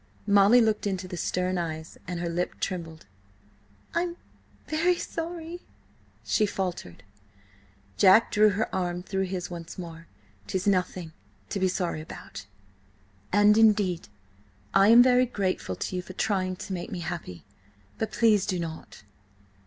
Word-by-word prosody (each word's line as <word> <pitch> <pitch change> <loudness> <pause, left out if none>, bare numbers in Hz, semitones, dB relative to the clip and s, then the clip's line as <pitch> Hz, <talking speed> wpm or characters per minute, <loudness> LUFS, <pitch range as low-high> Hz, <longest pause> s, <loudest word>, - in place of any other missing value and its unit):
Molly 205 +4 +6
looked 215 -2 +1
into 190 -2 -3
the 180 - -6
stern 180 +1 -1
eyes, 160 -1 -5
and 180 -1 -4
her 175 - -2
lip 175 +1 -2
trembled. 165 - -4 0.9
"I'm 345 0 -1 0.5
very–sorry!" 335 +1 -2 0.6
she 215 - +2
faltered. 180 - -4 0.9
Jack 200 +4 +6
drew 215 0 +5
her 205 +2 -2
arm 175 -1 -2
through 190 0 -1
his 180 -1 -4
once 170 -1 -8
more. 165 -2 -8 0.4
"'Tis 185 -1 -2
nothing 180 -4 0 0.4
to 200 - -2
be 190 - +2
sorry 180 -4 -2
about; 100 -9 -10 0.8
and, 205 +2 +5
indeed, 205 -6 +3 0.7
I 195 +1 +6
am 235 +2 +9
very 250 0 +4
grateful 185 - -2
to 185 - -4
you 180 - -1
for 185 - -11
trying 185 -2 -1
to 190 - -6
make 175 - -5
me 175 - -4
happy. 170 - -6 0.6
But 220 -1 -2
please 215 -4 +3
do 185 - 0
not!" 160 -9 -7
185 Hz, 140 wpm, -27 LUFS, 175-215 Hz, 0.9 s, am